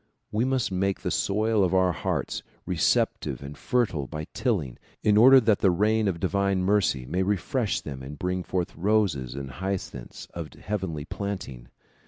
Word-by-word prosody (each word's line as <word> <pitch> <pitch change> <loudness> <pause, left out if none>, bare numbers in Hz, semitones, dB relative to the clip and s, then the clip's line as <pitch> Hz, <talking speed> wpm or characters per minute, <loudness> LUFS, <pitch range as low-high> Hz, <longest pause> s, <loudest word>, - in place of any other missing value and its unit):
We 110 +3 +1
must 130 -5 0
make 95 +1 0
the 90 - -2
soil 105 +6 +2
of 95 0 +1
our 95 -1 +4
hearts 80 - -2 0.2
receptive - - +1
and 70 +1 -7
fertile 95 - 0
by 75 -1 -5
tilling, 90 - -1 0.2
in 105 - +4
order 130 +5 +9
that 110 -4 +2
the 95 - +4
rain 105 +4 +2
of 90 -4 -1
divine 100 +1 +1
mercy 95 -10 +2
may 90 +8 -1
refresh 105 - 0
them 65 -3 -7
and 70 +3 -8
bring 90 +2 -1
forth 90 -1 -3
roses 85 - +1
and 70 -1 -6
hyacinths 95 -6 -5
of 80 -5 -6
heavenly 95 -8 -4
planting. 95 -12 -5
95 Hz, 165 wpm, -26 LUFS, 75-105 Hz, 0.2 s, order